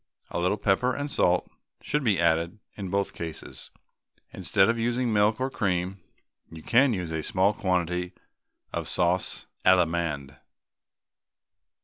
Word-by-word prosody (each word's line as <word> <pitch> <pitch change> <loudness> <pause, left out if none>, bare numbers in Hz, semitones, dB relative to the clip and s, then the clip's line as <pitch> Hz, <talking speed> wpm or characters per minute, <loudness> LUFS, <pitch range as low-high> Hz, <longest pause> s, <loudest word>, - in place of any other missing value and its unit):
A - - -2
little 90 +4 +1
pepper 105 +6 +1
and 145 0 -4
salt 90 0 +2 0.4
should 150 0 -1
be 105 -8 +2
added 85 +3 +1 0.2
in 100 -3 -5
both 100 +1 -1
cases. 80 -2 -7 0.6
Instead 95 - +2
of 115 0 +1
using 120 +2 0
either - - 0
milk 105 +2 +3
or 130 +1 -1
cream, 95 -2 -1 0.5
you 80 -1 -11
can 130 +3 +4
use 90 -6 -3
a 80 -1 -2
small 95 +6 +2
quantity 90 -3 -1 0.6
of - - -3
sauce 90 +1 0 0.2
Allemande. 80 -6 +2
95 Hz, 135 wpm, -27 LUFS, 85-110 Hz, 0.6 s, can